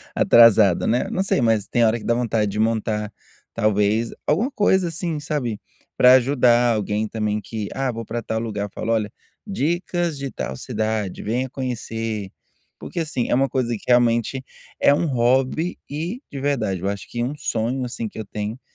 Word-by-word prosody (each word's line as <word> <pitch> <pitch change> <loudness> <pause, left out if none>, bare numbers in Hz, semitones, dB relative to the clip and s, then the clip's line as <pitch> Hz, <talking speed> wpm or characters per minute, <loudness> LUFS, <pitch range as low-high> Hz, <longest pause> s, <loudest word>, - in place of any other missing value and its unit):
atrasado, 110 -5 +6
né", 120 +3 +1
não 190 - 0
sei, 195 - +1
mas 115 -3 +2
tem 120 -1 +2
hora 110 +1 +2
que - - -11
dá 120 - +2
vontade 115 -3 0
de 105 - -4
montar 110 -1 0 0.4
talvez 110 +1 +1
alguma 215 - +1
coisa 190 -6 +2
assim, 165 -1 -3
sabe. 145 -8 -3 0.4
Pra 125 0 +7
ajudar 120 -2 +4
alguém 105 +1 -1
também 105 -1 -2
que, 105 0 -5
"Ah 135 -1 -1
vou 115 0 -6
para 115 +2 -4
tal 110 0 -2
lugar", 105 -3 -3
falo: 115 - -3
"Olha, 105 -2 -1 0.3
dicas 175 -3 -1
de 140 0 -4
tal 65 - -4
cidade, 110 - -3
venha 125 +5 -1
conhecer.". 115 -5 -4 0.5
Porque - - -6
assim, 150 -7 -2
é - - +2
uma 135 +2 +2
coisa 130 -3 -1
que 105 - -10
realmente 120 +1 +2 0.4
é - - +5
um 145 - +1
hobby 130 +6 +1
e 170 - -4
de 140 - -5
verdade, 115 -10 -1
eu 95 - -1
acho 100 0 -6
que 120 - -2
um 130 +4 -3
sonho 125 -2 -2
assim 120 -2 -4
que 110 - -10
eu 110 - -5
tenho, 105 +4 -5
120 Hz, 180 wpm, -22 LUFS, 110-135 Hz, 0.5 s, Pra